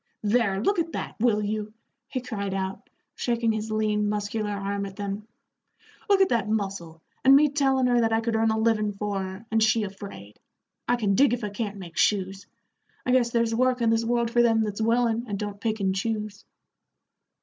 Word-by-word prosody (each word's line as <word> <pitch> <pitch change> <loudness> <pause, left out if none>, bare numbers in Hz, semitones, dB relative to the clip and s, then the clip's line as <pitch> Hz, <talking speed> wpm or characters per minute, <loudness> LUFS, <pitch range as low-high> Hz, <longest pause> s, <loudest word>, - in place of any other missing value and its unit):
"There, 210 -2 +2
look 400 +3 +2
at 330 0 -2
that, - - -4
will 215 -2 +2
you," 215 +1 -3 0.3
he 255 - -4
cried 200 -5 -4
out, 190 0 -4 0.2
shaking 235 -2 0
his 220 0 -3
lean, 210 -1 0
muscular 210 +1 -2
arm 200 0 -3
at 195 - -11
them; 200 +1 -5 0.8
"look 395 -1 +5
at 385 - +4
that 230 -3 0
muscle, 195 -6 -3 0.2
and 270 +1 +8
me 295 +1 +5
tellin' 270 -2 +2
her 245 -1 +3
that 225 -1 +1
I 225 - +3
could 225 0 -1
earn 225 0 +2
a 220 - +1
livin' 220 -2 +1
for 200 -1 -3
her, 190 +3 -7
and 225 0 +2
she 220 0 +3
afraid. 195 - -9 0.5
I 245 - +3
can 210 -5 0
dig 260 +4 +4
if 245 - -9
I 210 - -2
can't 205 -1 -4
make 175 -3 -10
shoes. 195 -1 +1 0.6
I 250 - +1
guess 250 -2 +3
there's 235 -1 +1
work 255 +2 +2
in 230 -1 +2
this 225 0 +2
world 235 0 0
for 240 - +4
them 225 -2 +3
that's 210 0 -3
willin', 230 +1 +1
and 205 -2 -3
don't 205 0 -5
pick 220 -1 -1
and 190 -1 +1
choose." 210 0 -3
220 Hz, 205 wpm, -26 LUFS, 200-235 Hz, 0.8 s, and